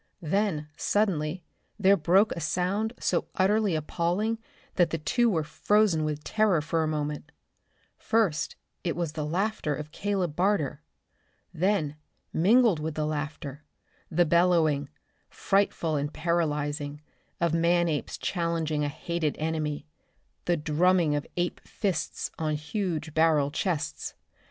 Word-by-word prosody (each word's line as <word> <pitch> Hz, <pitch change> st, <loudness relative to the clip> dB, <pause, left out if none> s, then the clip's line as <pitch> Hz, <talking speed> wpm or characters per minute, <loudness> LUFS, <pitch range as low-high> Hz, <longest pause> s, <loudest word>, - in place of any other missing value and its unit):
Then 165 Hz, -3 st, 0 dB
suddenly 180 Hz, -5 st, 0 dB, 0.3 s
there 200 Hz, -1 st, +5 dB
broke 190 Hz, +5 st, +4 dB
a -, -, -3 dB
sound 185 Hz, +8 st, 0 dB
so 175 Hz, -, 0 dB
utterly 200 Hz, -1 st, +2 dB
appalling 175 Hz, +8 st, -1 dB, 0.3 s
that 175 Hz, -3 st, +3 dB
the 165 Hz, -, -1 dB
two 235 Hz, +10 st, +2 dB
were 165 Hz, -7 st, +1 dB
frozen 170 Hz, +3 st, +2 dB
with 150 Hz, -1 st, -2 dB
terror 215 Hz, -6 st, +2 dB
for 160 Hz, +2 st, 0 dB
a 160 Hz, -, +1 dB
moment. 150 Hz, 0 st, -3 dB, 0.7 s
First 215 Hz, -9 st, +1 dB, 0.3 s
it 170 Hz, -, -1 dB
was 170 Hz, -3 st, -2 dB
the 155 Hz, -1 st, -4 dB
laughter 170 Hz, -1 st, -1 dB
of 150 Hz, +1 st, -7 dB
Caleb 190 Hz, -4 st, -1 dB
Barter. 175 Hz, -6 st, +1 dB, 0.7 s
Then, 165 Hz, -5 st, 0 dB, 0.4 s
mingled 210 Hz, +1 st, +4 dB
with 155 Hz, 0 st, -3 dB
the 155 Hz, -, 0 dB
laughter, 150 Hz, -1 st, -4 dB, 0.5 s
the 175 Hz, +2 st, +3 dB
bellowing, 165 Hz, -4 st, +3 dB, 0.4 s
frightful 195 Hz, -5 st, +1 dB
and 145 Hz, +1 st, -2 dB
paralyzing, 150 Hz, -4 st, -1 dB, 0.4 s
of 170 Hz, -2 st, +1 dB
man 170 Hz, +1 st, +3 dB
apes 150 Hz, -3 st, -2 dB
challenging 165 Hz, -4 st, -1 dB
a 145 Hz, -, 0 dB
hated 160 Hz, +1 st, -2 dB
enemy. 155 Hz, -, -2 dB, 0.6 s
The 175 Hz, -1 st, +2 dB
drumming 165 Hz, +1 st, +3 dB
of 145 Hz, 0 st, -2 dB
ape 175 Hz, 0 st, -1 dB
fists 190 Hz, -6 st, -2 dB
on 155 Hz, -1 st, 0 dB
huge 160 Hz, -1 st, -3 dB
barrel 155 Hz, -3 st, +3 dB
chests. 160 Hz, -2 st, -2 dB
165 Hz, 130 wpm, -28 LUFS, 150-185 Hz, 0.7 s, there